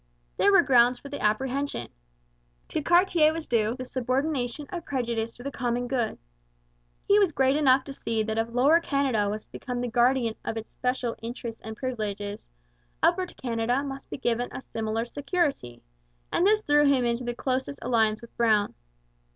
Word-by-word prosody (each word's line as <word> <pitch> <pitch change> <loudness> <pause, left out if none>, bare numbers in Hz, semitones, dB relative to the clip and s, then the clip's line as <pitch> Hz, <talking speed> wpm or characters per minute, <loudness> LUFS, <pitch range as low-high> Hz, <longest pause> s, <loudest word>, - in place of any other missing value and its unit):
There 200 - +4
were 195 - +6
grounds 245 -1 +5
for 280 - -11
the 285 - -5
apprehension. 255 - -1 0.8
To 315 - -1
Cartier 345 -1 +4
was 320 0 -5
due 225 -1 +1
the 255 0 -6
subordination 260 +1 -1
of 345 -2 -4
prejudice 235 -5 -2
to 245 - -12
the 280 - -4
common 245 -1 -2
good. 245 -4 -1 0.9
He 405 +1 +6
was 395 -5 +3
great 265 -2 +2
enough 270 -3 +4
to 275 - -8
see 225 -4 -2
that 220 +1 -2
if 225 +1 -1
Lower 270 +8 +4
Canada 270 -10 0
was 215 +1 -4
to - - -40
become 250 -2 -5
the 245 - -1
guardian 240 0 +2
of 225 - -3
its 225 - -7
special 250 -2 -1
interests 230 0 -6
and 220 0 -7
privileges, 210 - -4 0.5
Upper 365 +2 +3
Canada 245 -1 -1
must 275 -1 -7
be - - -5
given 240 -1 -1
a - - -6
similar 225 -1 -3
security; 280 - -2 0.5
and 360 - +3
this 430 +1 +3
threw 295 -2 +4
him 265 -3 +3
into 235 +1 0
the 240 0 -3
closest 260 +2 -2
alliance 220 -3 +2
with 235 - -13
Brown. 215 -3 +3
245 Hz, 175 wpm, -27 LUFS, 225-280 Hz, 0.9 s, were